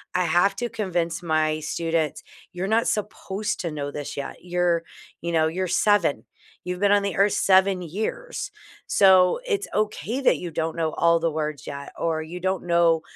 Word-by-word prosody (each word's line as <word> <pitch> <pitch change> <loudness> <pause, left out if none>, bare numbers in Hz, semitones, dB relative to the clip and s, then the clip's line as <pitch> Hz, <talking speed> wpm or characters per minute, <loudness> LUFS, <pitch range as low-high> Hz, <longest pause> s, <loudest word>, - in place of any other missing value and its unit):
I 180 0 +2
have 175 +4 +3
to 240 - -1
convince 175 -6 -2
my 155 -1 +1
students, 165 -1 -1 0.3
you're 185 +1 -3
not 225 +2 +2
supposed 210 0 -2
to 170 -3 -3
know 145 -1 -4
this 145 -1 -6
yet. 140 - -5
You're, 175 -1 +1 0.4
you 170 - -3
know, 160 -1 +3
you're 185 +4 -2
7. 180 -3 +2 0.4
You've 180 0 -3
been 205 -1 +4
on 205 0 +4
the 200 -3 -2
earth 200 +1 +4
7 190 -1 +3
years. 220 - -4 0.4
So, 185 -2 +5
it's 410 -3 -1
okay 215 +3 -1
that 265 - +4
you 175 -2 -6
don't 160 +1 -2
know 160 -1 0
all 170 0 +3
the 165 0 0
words 150 -1 -4
yet 140 0 -7
or 165 -1 -1
you 170 +3 -7
don't 190 0 -1
know, 170 -2 +3
175 Hz, 180 wpm, -24 LUFS, 160-200 Hz, 0.4 s, So